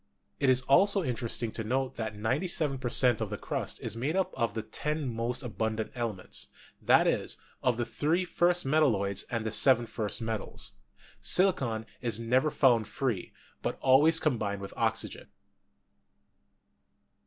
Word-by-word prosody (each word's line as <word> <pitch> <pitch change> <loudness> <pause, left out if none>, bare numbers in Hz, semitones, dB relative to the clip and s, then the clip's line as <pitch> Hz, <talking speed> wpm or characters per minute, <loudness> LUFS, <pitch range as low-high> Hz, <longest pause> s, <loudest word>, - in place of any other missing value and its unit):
It 140 - +2
is 130 0 +4
also 195 +8 +4
interesting 120 -3 -2
to 110 - -3
note 130 +4 -1
that 110 -2 -4
97 135 - 0
per 125 -2 -3
cent, 120 -2 +4
of 110 - -2
the 105 - -4
crust - - -4
is - - -3
made 135 +8 -2
up 190 -1 0
of 115 -3 -1
the 110 - -3
10 150 +5 -3
most 120 +2 -2
abundant 110 0 -3
elements; 115 -6 -4 0.3
that - - +5
is, - - 0 0.2
of 125 -3 +1
the 120 - -1
3 165 +9 0
first 175 0 +2
metalloids 115 -10 +2
and 115 -2 -2
the 110 - -2
7 120 +1 +4
first 110 -2 -2
metals. 110 -2 -4 0.5
Silicon 130 - +2 0.2
is 115 -3 -1
never 125 +6 +2
found 120 -7 +3
free, 115 -5 -3 0.3
but - - -3
always 145 +5 +5
combined 110 -9 -1
with 100 0 -8
oxygen. - - -2
120 Hz, 155 wpm, -29 LUFS, 110-140 Hz, 0.5 s, that